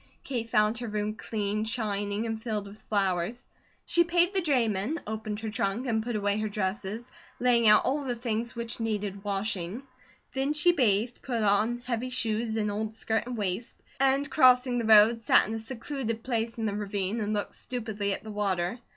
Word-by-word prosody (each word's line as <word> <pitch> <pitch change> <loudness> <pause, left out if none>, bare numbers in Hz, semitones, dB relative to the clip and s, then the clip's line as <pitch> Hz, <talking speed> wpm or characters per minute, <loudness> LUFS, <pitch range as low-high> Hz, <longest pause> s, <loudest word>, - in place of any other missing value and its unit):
Kate 235 -4 -3
found 215 +1 +2
her 240 - -4
room 210 0 -2
cleaned, 215 0 -2
shining, 205 -1 -1
and 225 -1 -3
filled 215 -3 -3
with 205 +2 -13
flowers. 195 +3 0 0.4
She 345 - +4
paid 345 +2 +2
the 385 - +3
drayman, 245 - +1
opened 215 0 -4
her 220 - -3
trunk, 210 +3 -1
and 225 -3 +1
put 235 +1 -3
away 205 0 0
her 215 0 -1
dresses, 210 +3 -3 0.3
laying 240 -2 +4
out 210 0 +6
all 285 +2 0
the 250 -3 -2
things 235 0 -3
which 235 0 -4
needed 205 -3 -2
washing; 200 +2 -3 0.5
then 270 +2 0
she 300 +4 +4
bathed, 235 - +1
put 235 -4 -2
on 210 +4 +2
heavy 245 0 -2
shoes, 225 -2 0
and 210 -2 0
old 215 +1 -3
skirt 225 +1 -1
and 250 -1 -4
waist, 200 +2 -3 0.2
and 275 +1 +3
crossing 255 -3 +5
the 230 - -2
road 220 +1 +7
sat - - +5
in 220 - -4
a 225 - -2
secluded 230 0 -4
place 230 -2 -2
in 225 - -2
the 205 - -1
ravine 205 +1 -2
and 210 0 -1
looked 205 - -3
stupidly 220 -5 -3
at 195 - -3
the 220 - -7
water. 195 0 -1
220 Hz, 190 wpm, -28 LUFS, 210-245 Hz, 0.5 s, road